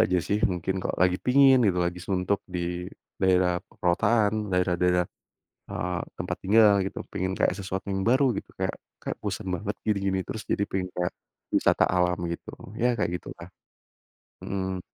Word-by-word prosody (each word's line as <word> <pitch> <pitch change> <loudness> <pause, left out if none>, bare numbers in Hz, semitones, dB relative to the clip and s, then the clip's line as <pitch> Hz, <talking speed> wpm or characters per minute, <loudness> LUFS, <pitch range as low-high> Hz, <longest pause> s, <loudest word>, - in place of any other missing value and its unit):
aja 90 0 +3
sih, 100 +5 0
mungkin 95 +1 -2
kalau - - -2
lagi 90 0 +4
pingin 130 -1 +6
gitu, 95 -4 +2
lagi 90 0 -1
suntuk 95 +1 0
di 90 0 -3 0.3
daerah 90 -2 +3
perkotaan, 105 +3 +1
daerah-daerah, 90 -1 +2 0.7
eee, 90 -1 -2 0.2
tempat - - -3
tinggal 105 +1 +6
gitu. 95 - -4
Pengen 95 +1 -1
kayak - - +2
sesuatu 95 -1 -5
yang 95 - -1
baru 130 +3 +3
gitu, - - -6
kayak - - -1 0.3
kayak - - -4
bosen 100 -1 -3
banget 105 +3 -4
gini-gini 100 -2 +1
terus, 110 - -5
jadi 100 - +1
pingin 90 -1 -3
kayak, 90 0 -2 0.4
wisata - - +4
alam 90 0 +1
gitu, 85 0 -5 0.2
ya 120 0 +1
kayak 95 - +1
gitulah. 85 0 -9 0.9
Mhm. 95 -1 -3
95 Hz, 155 wpm, -27 LUFS, 90-105 Hz, 0.9 s, pingin